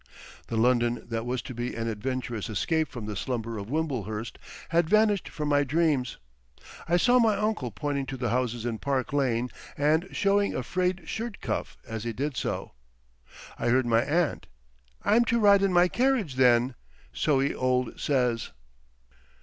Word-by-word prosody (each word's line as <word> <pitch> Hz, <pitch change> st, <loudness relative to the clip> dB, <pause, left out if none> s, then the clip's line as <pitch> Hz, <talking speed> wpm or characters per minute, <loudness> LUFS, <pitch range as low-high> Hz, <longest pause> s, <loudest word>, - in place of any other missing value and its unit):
The 115 Hz, -, -3 dB
London 120 Hz, 0 st, +2 dB
that 115 Hz, 0 st, -3 dB
was 125 Hz, -1 st, -2 dB
to 130 Hz, -, -7 dB
be 120 Hz, +1 st, -4 dB
an 115 Hz, 0 st, -3 dB
adventurous 115 Hz, 0 st, -3 dB
escape 160 Hz, -, 0 dB
from 120 Hz, -6 st, -7 dB
the 105 Hz, 0 st, -4 dB
slumber 115 Hz, 0 st, -3 dB
of 100 Hz, +2 st, -7 dB
Wimblehurst, 120 Hz, -, -3 dB, 0.3 s
had 165 Hz, -1 st, +2 dB
vanished 215 Hz, -2 st, +3 dB
from 150 Hz, -2 st, -4 dB
my 145 Hz, 0 st, +4 dB
dreams. 145 Hz, -3 st, +1 dB, 0.7 s
I 175 Hz, -, +4 dB
saw 245 Hz, +7 st, +4 dB
my 225 Hz, -3 st, +4 dB
uncle 210 Hz, -, -1 dB
pointing 140 Hz, +4 st, -3 dB
to 135 Hz, -, -5 dB
the 125 Hz, -1 st, -1 dB
houses 120 Hz, -2 st, -1 dB
in 115 Hz, -2 st, -2 dB
Park 135 Hz, -1 st, -1 dB
Lane 125 Hz, -3 st, +1 dB, 0.3 s
and 155 Hz, +5 st, +2 dB
showing 200 Hz, 0 st, +1 dB
a -, -, -2 dB
frayed 185 Hz, 0 st, -1 dB
shirt 225 Hz, -2 st, -4 dB
cuff -, -, -3 dB
as 110 Hz, -1 st, -5 dB
he 120 Hz, -1 st, -3 dB
did 140 Hz, +4 st, -3 dB
so. -, -, -3 dB, 0.9 s
I -, -, -1 dB
heard 130 Hz, +1 st, +3 dB
my 115 Hz, -1 st, +3 dB
aunt: 155 Hz, +5 st, 0 dB, 0.6 s
"I'm 225 Hz, +3 st, +4 dB
to 235 Hz, +1 st, +2 dB
ride 200 Hz, -2 st, +6 dB
in 195 Hz, -1 st, +2 dB
my 175 Hz, 0 st, +5 dB
carriage 245 Hz, -, +1 dB
then. 125 Hz, 0 st, +4 dB, 0.4 s
So 145 Hz, -3 st, +2 dB
he 140 Hz, +1 st, +1 dB
old 125 Hz, -1 st, 0 dB
says." 125 Hz, -5 st, 0 dB
130 Hz, 170 wpm, -27 LUFS, 120-175 Hz, 0.9 s, ride